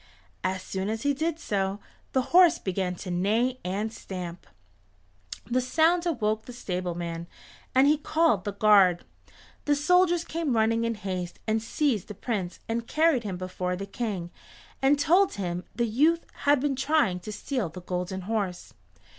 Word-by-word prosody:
As 185 0 -1
soon 190 +1 -3
as 220 +1 -3
he 285 0 +2
did 315 +3 -1
so, 195 -8 -2 0.3
the 260 - +2
horse 350 -2 +7
began 185 -1 -2
to 180 +1 -6
neigh 225 +8 +1
and 205 +5 -2
stamp. 180 -4 -7 1.0
The 250 +1 +1
sound 330 +7 +2
awoke 220 -8 0
the 245 - -9
stableman, 175 -5 -4 0.5
and 260 +1 +6
he 295 +1 +4
called 310 - +2
the 205 - -3
guard. 200 -4 +5 0.6
The 290 - +3
soldiers 350 +3 +3
came 320 -6 -1
running 225 +1 +2
in 230 0 -1
haste 185 -4 -4
and 220 0 +1
seized 230 - 0
the 210 - -8
Prince 190 -5 -3
and 230 +1 -2
carried 310 -6 +3
him 195 -4 -4
before 180 0 -3
the 195 +2 -5
King 200 -5 -4 0.5
and 275 +2 +4
told 360 +7 +4
him 180 -3 -3
the 235 - +1
youth 300 +10 +2 0.2
had 285 -1 +5
been 280 0 0
trying 265 -9 +2
to 195 +4 -7
steal 230 - -3
the 180 +3 -9
Golden 180 +1 -3
Horse. 195 -3 -3
220 Hz, 165 wpm, -27 LUFS, 185-285 Hz, 1.0 s, horse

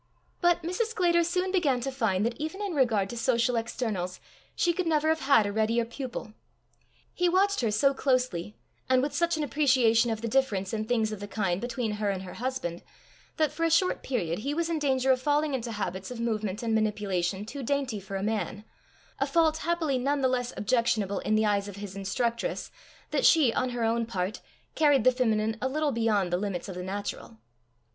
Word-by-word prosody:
But 350 -1 +3
Mrs. 365 +7 -1
Sclater 350 -6 +2
soon 365 +2 0
began 300 -10 +2
to 270 +2 -2
find 220 -6 0
that 235 0 -1
even 315 +6 -4
in 405 -3 -3
regard 230 -9 +2
to 240 - -6
social 235 +1 +2
externals, 220 -6 -3 0.4
she 345 - +2
could 360 0 -2
never 310 -1 +2
have 320 0 +2
had 270 -6 +4
a 205 - -2
readier 220 +2 +1
pupil. 235 -3 -6 0.8
He 355 0 +2
watched 395 +1 +2
her 230 - +1
so 275 +7 +3
closely, 250 -9 0 0.3
and 255 0 +4
with 285 - -2
such 340 -1 +1
an 310 - -1
appreciation 255 -5 +3
of 220 -1 -2
the 235 - -2
difference 220 -6 0
in 215 -1 -1
things 220 -2 +1
of 215 - -5
the 205 - -6
kind 195 -3 -1
between 240 -2 -2
her 210 -1 -1
and 190 -1 -2
her 180 - -8
husband, 245 -9 -3 0.6
that 310 -3 +2
for 315 +2 -4
a 330 - +3
short 350 +3 +2
period 175 -10 -2
he 280 +6 -2
was 335 +1 -1
in 325 - 0
danger 265 -2 +2
of 255 -1 +2
falling 295 +1 +1
into 240 -3 -3
habits 190 -3 -4
of 250 -2 -7
movement 215 -3 -2
and 225 -1 0
manipulation 205 -3 0
too 275 +6 -7
dainty 265 -4 -1
for 195 0 -7
a 195 - -2
man, 210 -1 -2 0.5
a - - +1
fault 320 -2 +3
happily 325 -5 0
none 280 +2 0
the 260 - +4
less 250 -1 -1
objectionable 215 -3 +1
in 215 - 0
the 215 0 +3
eyes 205 -1 +1
of 200 - -8
his 200 -1 -7
instructress, 235 - -2 0.4
that - - 0
she, 290 -9 +5
on 255 - 0
her 245 -1 -3
own 230 0 +1
part, 190 -2 -3 0.3
carried 290 -6 +4
the 255 - +6
feminine 220 -3 0
a 260 - 0
little 300 +1 0
beyond 215 -6 +1
the - - +3
limits 195 -4 -3
of 190 - -6
the 180 - -6
natural. 190 - -5
235 Hz, 210 wpm, -28 LUFS, 210-285 Hz, 0.8 s, the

